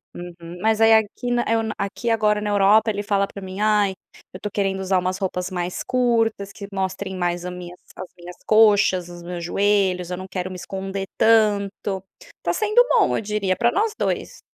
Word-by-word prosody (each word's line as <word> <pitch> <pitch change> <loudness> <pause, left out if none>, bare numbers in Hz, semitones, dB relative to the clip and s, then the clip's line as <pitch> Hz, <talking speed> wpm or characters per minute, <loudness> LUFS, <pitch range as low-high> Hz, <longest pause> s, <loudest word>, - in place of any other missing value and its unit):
uhum, 175 0 -9
mas 220 +1 +2
aí 225 0 +6
aqui 220 +3 +1
na 240 0 +1
eu 225 0 +2 0.2
aqui 200 +4 -3
agora 210 -2 +2
na 210 0 -2
Europa 210 +2 +4
ele 205 0 -3
fala 200 -1 +1
pra 200 - -10
mim: 190 +1 -7
"Ai, 210 -2 +3 0.4
eu 185 - -8
tô 210 - -4
querendo 195 -2 -1
usar 190 -1 +1
umas 185 +1 -2
roupas 185 -2 -3
mais 180 -1 -3
curtas 225 -5 0
que 200 -2 -8
mostrem 190 0 -3
mais 175 -1 -2
a 180 - -4
minhas 180 0 -9 0.2
as 185 - -7
minhas 175 +1 -10
coxas 205 -5 +4
os 175 0 -10
meus 175 -1 -6
joelhos, 190 -1 +1
eu 180 - -3
não 185 - -7
quero 185 -1 -4
me - - -7
esconder 195 +1 -5
tanto." 205 -3 +2 0.4
Tá - - 0
sendo 430 +3 +4
bom 460 -5 +3
eu - - -2
diria 205 -3 -1
pra 235 +5 +2
nós 425 - 0
dois. - - -3
200 Hz, 200 wpm, -22 LUFS, 185-215 Hz, 0.4 s, aí